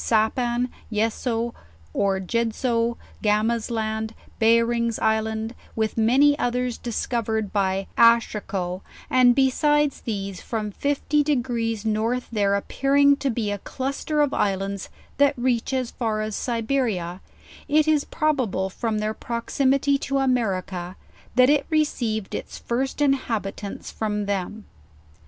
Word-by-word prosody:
Sapan, 240 Hz, +2 st, +1 dB, 0.2 s
Yesso, 230 Hz, +2 st, -1 dB, 0.4 s
or 195 Hz, -1 st, +1 dB
Jedso, 230 Hz, +3 st, 0 dB, 0.2 s
Gama's 215 Hz, +2 st, +1 dB
Land, 220 Hz, -1 st, -2 dB, 0.2 s
Behring's 230 Hz, 0 st, +3 dB
Isle, 220 Hz, 0 st, 0 dB, 0.3 s
with 220 Hz, -1 st, -1 dB
many 260 Hz, +6 st, +4 dB
others 245 Hz, 0 st, -1 dB
discovered 220 Hz, -3 st, -2 dB
by 195 Hz, -1 st, +1 dB
Aschirikow, 205 Hz, -6 st, +3 dB, 0.3 s
and 250 Hz, -1 st, +6 dB
be 265 Hz, -1 st, +4 dB
sides 295 Hz, 0 st, +2 dB
these, 195 Hz, -4 st, -4 dB
from 215 Hz, -2 st, -3 dB
51) 290 Hz, +5 st, 0 dB
degrees 235 Hz, -6 st, -1 dB
north 225 Hz, +3 st, 0 dB
there 200 Hz, -3 st, +2 dB
appearing 280 Hz, +7 st, +3 dB
to 280 Hz, -, -1 dB
be 225 Hz, -4 st, -1 dB
a 205 Hz, -, -3 dB
cluster 275 Hz, +6 st, -2 dB
of 290 Hz, -1 st, +1 dB
Islands 195 Hz, 0 st, -1 dB, 0.3 s
that 285 Hz, -1 st, +4 dB
reach 240 Hz, -1 st, 0 dB
is 260 Hz, -2 st, -1 dB
far 220 Hz, -3 st, -1 dB
as 215 Hz, -1 st, -3 dB
Siberia, 225 Hz, -7 st, -1 dB, 0.5 s
it 305 Hz, +1 st, +3 dB
is 305 Hz, -2 st, +3 dB
brobable 255 Hz, -, 0 dB
from 220 Hz, +2 st, -2 dB
their 215 Hz, +1 st, -1 dB
proximity 275 Hz, +5 st, +1 dB
to 275 Hz, 0 st, -1 dB
America, 195 Hz, -9 st, -1 dB, 0.4 s
that 255 Hz, +2 st, +6 dB
it 290 Hz, -1 st, +2 dB
received 240 Hz, -, 0 dB
its -, -, -5 dB
first 265 Hz, +4 st, -1 dB
in 275 Hz, -1 st, +5 dB
habitants 210 Hz, -6 st, -4 dB
from 210 Hz, -1 st, -2 dB
them. 200 Hz, +2 st, -3 dB
230 Hz, 125 wpm, -24 LUFS, 215-260 Hz, 0.5 s, and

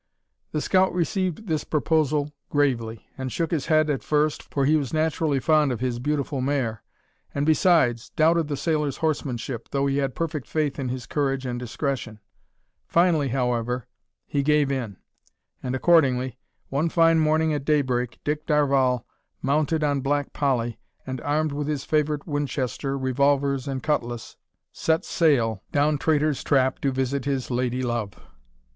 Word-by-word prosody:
The 150 Hz, -, -1 dB
scout 185 Hz, +2 st, +2 dB
received 185 Hz, +2 st, -1 dB
this 160 Hz, -5 st, -1 dB
proposal 150 Hz, -1 st, +1 dB, 0.2 s
gravely, 120 Hz, -6 st, 0 dB
and 130 Hz, -1 st, -3 dB
shook 165 Hz, +4 st, -2 dB
his 155 Hz, -5 st, -1 dB
head 155 Hz, -2 st, +4 dB
at 145 Hz, -3 st, -1 dB
first, 150 Hz, 0 st, +1 dB
for 140 Hz, -1 st, -1 dB
he 150 Hz, +3 st, +4 dB
was 140 Hz, -5 st, -1 dB
naturally 155 Hz, -2 st, +1 dB
fond 150 Hz, 0 st, +3 dB
of 120 Hz, -, -3 dB
his 125 Hz, -1 st, -2 dB
beautiful 140 Hz, 0 st, -1 dB
mare, 130 Hz, -5 st, -1 dB, 0.5 s
and, 140 Hz, +1 st, 0 dB
besides, 155 Hz, -, +3 dB
doubted 165 Hz, 0 st, +2 dB
the 145 Hz, -2 st, -3 dB
sailor's 150 Hz, -3 st, 0 dB
horsemanship, 130 Hz, -6 st, -2 dB
though 140 Hz, 0 st, 0 dB
he 140 Hz, 0 st, +1 dB
had 135 Hz, -2 st, -1 dB
perfect 155 Hz, -5 st, -3 dB
faith 150 Hz, -3 st, -1 dB
in 130 Hz, -2 st, -2 dB
his 125 Hz, -1 st, -4 dB
courage 135 Hz, +1 st, -1 dB
and 120 Hz, -1 st, -3 dB
discretion. 125 Hz, -2 st, -3 dB, 0.7 s
Finally, 170 Hz, -4 st, +3 dB
however, 125 Hz, -1 st, -1 dB, 0.4 s
he 140 Hz, -, -1 dB
gave 150 Hz, -1 st, +2 dB
in; 120 Hz, -8 st, -3 dB, 0.6 s
and 125 Hz, 0 st, -2 dB
accordingly, 130 Hz, -5 st, +3 dB, 0.3 s
one 150 Hz, +5 st, 0 dB
fine 165 Hz, -1 st, +4 dB
morning 155 Hz, 0 st, +2 dB
at 145 Hz, -2 st, -2 dB
daybreak, 130 Hz, -5 st, 0 dB
Dick 150 Hz, +1 st, -2 dB
Darvall, 135 Hz, -5 st, +2 dB, 0.4 s
mounted 155 Hz, +3 st, +1 dB
on 145 Hz, -2 st, +1 dB
Black 145 Hz, +1 st, -1 dB
Polly, 120 Hz, -5 st, 0 dB, 0.3 s
and 130 Hz, -2 st, -5 dB
armed 155 Hz, +1 st, 0 dB
with 145 Hz, 0 st, -3 dB
his 145 Hz, -2 st, -2 dB
favourite 150 Hz, -1 st, 0 dB
Winchester, 140 Hz, -2 st, -2 dB
revolvers, 140 Hz, +1 st, +1 dB
and 135 Hz, -2 st, -3 dB
cutlass, 120 Hz, -6 st, -2 dB, 0.4 s
"set 160 Hz, 0 st, 0 dB
sail" 120 Hz, -, +2 dB
down 145 Hz, 0 st, +2 dB
Traitor's 155 Hz, -2 st, +1 dB
Trap 130 Hz, -2 st, +2 dB
to 135 Hz, -, 0 dB
visit 135 Hz, +1 st, -1 dB
his 135 Hz, -2 st, -2 dB
lady 125 Hz, +1 st, -1 dB
love! 120 Hz, -5 st, -2 dB
140 Hz, 155 wpm, -25 LUFS, 130-155 Hz, 0.7 s, head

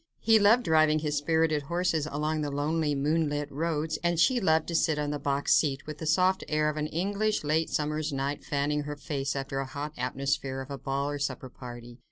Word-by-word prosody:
He 225 Hz, -1 st, +5 dB
loved 220 Hz, +4 st, +5 dB
driving 155 Hz, -4 st, +4 dB
his 150 Hz, -1 st, -1 dB
spirited 160 Hz, 0 st, +1 dB
horses 170 Hz, 0 st, 0 dB
along 155 Hz, +1 st, -1 dB
the 145 Hz, -, -2 dB
lonely, 150 Hz, +1 st, 0 dB
moonlit 145 Hz, 0 st, 0 dB
roads, 155 Hz, +1 st, -2 dB
and 170 Hz, -1 st, +1 dB
she 255 Hz, +7 st, +4 dB
loved 160 Hz, -4 st, +2 dB
to 170 Hz, -, -2 dB
sit 160 Hz, -2 st, +2 dB
on 145 Hz, -1 st, -1 dB
the 145 Hz, -, -3 dB
box 140 Hz, 0 st, +1 dB
seat, 140 Hz, -3 st, +1 dB
with 150 Hz, -1 st, -7 dB
the 160 Hz, -, -4 dB
soft 185 Hz, +4 st, +3 dB
air 150 Hz, 0 st, +1 dB
of 155 Hz, -, -4 dB
an 150 Hz, 0 st, -1 dB
English 200 Hz, +6 st, -1 dB
late 155 Hz, +2 st, +1 dB
summer's 150 Hz, +1 st, -1 dB
night 140 Hz, +1 st, -2 dB
fanning 145 Hz, +1 st, 0 dB
her 150 Hz, 0 st, -4 dB
face 140 Hz, -1 st, -3 dB
after 135 Hz, 0 st, -3 dB
the 135 Hz, -, -1 dB
hot 145 Hz, +3 st, -6 dB
atmosphere 135 Hz, +1 st, -1 dB
of 135 Hz, +1 st, -7 dB
a 140 Hz, -, -5 dB
ball 140 Hz, +3 st, -2 dB
or 145 Hz, -, -4 dB
supper 130 Hz, -2 st, -3 dB
party. 120 Hz, -1 st, -10 dB
150 Hz, 215 wpm, -28 LUFS, 140-160 Hz, -, He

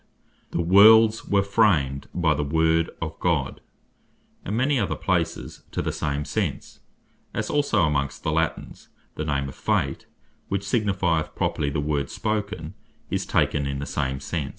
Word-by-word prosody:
3.) 85 Hz, -, -1 dB
"The -, -, -6 dB
worlds 110 Hz, +4 st, +7 dB
were 100 Hz, -1 st, +2 dB
framed 85 Hz, -10 st, +2 dB
by 85 Hz, -3 st, +2 dB
the 75 Hz, 0 st, -1 dB
Word 80 Hz, +2 st, +2 dB
of 80 Hz, 0 st, -6 dB
God;" 80 Hz, -7 st, -1 dB, 0.8 s
and 105 Hz, +4 st, -3 dB
many 130 Hz, +2 st, +2 dB
other 100 Hz, -, -1 dB
places 85 Hz, -3 st, -2 dB
to -, -, -2 dB
the -, -, -1 dB
same 75 Hz, 0 st, -2 dB
sense: -, -, -3 dB, 0.6 s
As -, -, -2 dB
also 140 Hz, -10 st, +2 dB
amongst 70 Hz, -3 st, -1 dB
the 80 Hz, -, 0 dB
Latines, 80 Hz, +1 st, -2 dB, 0.2 s
the 75 Hz, -, -4 dB
name 70 Hz, -2 st, -1 dB
of 70 Hz, -, -8 dB
Fate, -, -, -1 dB, 0.4 s
which 100 Hz, 0 st, -2 dB
signifieth 95 Hz, -8 st, 0 dB
properly 70 Hz, -, -1 dB
The 70 Hz, -, -2 dB
Word 70 Hz, -2 st, -1 dB
Spoken, 100 Hz, -6 st, -3 dB, 0.4 s
is -, -, -1 dB
taken 70 Hz, -1 st, +1 dB
in 70 Hz, 0 st, -3 dB
the 70 Hz, -, -4 dB
same 65 Hz, -1 st, -2 dB
sense. 70 Hz, 0 st, -3 dB
80 Hz, 160 wpm, -24 LUFS, 75-100 Hz, 0.8 s, worlds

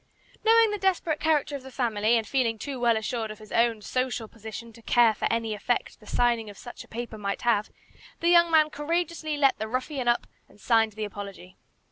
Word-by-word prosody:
Knowing 455 Hz, -1 st, +5 dB
the 415 Hz, -, -3 dB
desperate 360 Hz, -5 st, 0 dB
character 300 Hz, -2 st, +1 dB
of 275 Hz, -, -6 dB
the 265 Hz, -, -11 dB
family, 235 Hz, -3 st, +1 dB
and 225 Hz, -, -1 dB
feeling 240 Hz, -5 st, +1 dB
too 270 Hz, +3 st, -5 dB
well 235 Hz, -2 st, +3 dB
assured 220 Hz, 0 st, -3 dB
of 215 Hz, -, -8 dB
his 215 Hz, 0 st, -14 dB
own 230 Hz, -2 st, +2 dB
social 255 Hz, -1 st, -2 dB
position 225 Hz, +1 st, -9 dB
to 230 Hz, -, -15 dB
care 230 Hz, -1 st, +4 dB
for -, -, -2 dB
any 225 Hz, -1 st, -1 dB
effect 220 Hz, +4 st, -2 dB
the 210 Hz, -, -18 dB
signing 235 Hz, -3 st, +1 dB
of 205 Hz, -, -12 dB
such 240 Hz, -, -10 dB
a -, -, -19 dB
paper 235 Hz, -1 st, -6 dB
might 200 Hz, -1 st, -3 dB
have, 220 Hz, -3 st, +2 dB, 0.5 s
the 340 Hz, -, +2 dB
young 340 Hz, -1 st, +6 dB
man 310 Hz, -2 st, +4 dB
courageously 320 Hz, 0 st, -2 dB
let 275 Hz, -5 st, +3 dB
the 220 Hz, -, -3 dB
ruffian 255 Hz, +2 st, -3 dB
up 240 Hz, 0 st, +2 dB, 0.2 s
and -, -, -21 dB
signed 225 Hz, -1 st, +2 dB
the 215 Hz, +1 st, -4 dB
apology. 200 Hz, -3 st, -9 dB
240 Hz, 210 wpm, -27 LUFS, 220-290 Hz, 0.5 s, young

